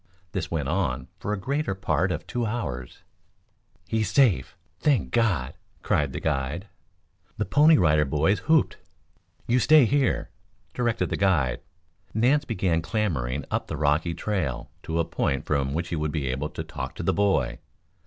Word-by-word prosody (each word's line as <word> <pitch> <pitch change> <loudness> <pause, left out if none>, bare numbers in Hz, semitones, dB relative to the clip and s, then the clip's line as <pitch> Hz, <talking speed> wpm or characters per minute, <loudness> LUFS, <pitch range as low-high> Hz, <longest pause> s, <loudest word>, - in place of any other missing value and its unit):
This 90 0 -3
went 75 -5 -2
on 70 -7 -1
for 105 - -2
the - - -7
greater 135 -1 -1
part 95 -1 0
of 80 - -3
two 120 - -2
hours. 65 - -5 0.8
"He's 110 -1 0
safe. 110 - +2 0.2
Thank 135 - +1
God!" 100 - +1 0.3
cried 70 -2 +1
the - - -4
guide. 70 +9 -2 0.7
The 105 - 0
Pony 150 - +5
Rider 75 -5 +4
Boys 75 +8 +1
whooped. 160 -2 +3 0.7
"You 120 +2 +2
stay 150 +1 +6
here!" 135 +2 +1 0.4
directed 120 -2 0
the - - 0
guide. 85 -10 +2 0.5
Nance 135 +7 +3
began 90 -8 0
clambering 75 - -1
up - - -1
the 75 - -4
rocky 75 +3 +1
trail 90 - -2
to 80 - -3
a 85 - +2
point 70 -3 -1
from 70 -2 0
which 85 +4 -2
he 85 - -2
would 75 -1 -1
be 70 -5 -2
able 70 +4 -2
to - - -5
talk - - -6
to - - -5
the - - +2
boy. 70 -12 +1
90 Hz, 165 wpm, -26 LUFS, 75-110 Hz, 0.8 s, stay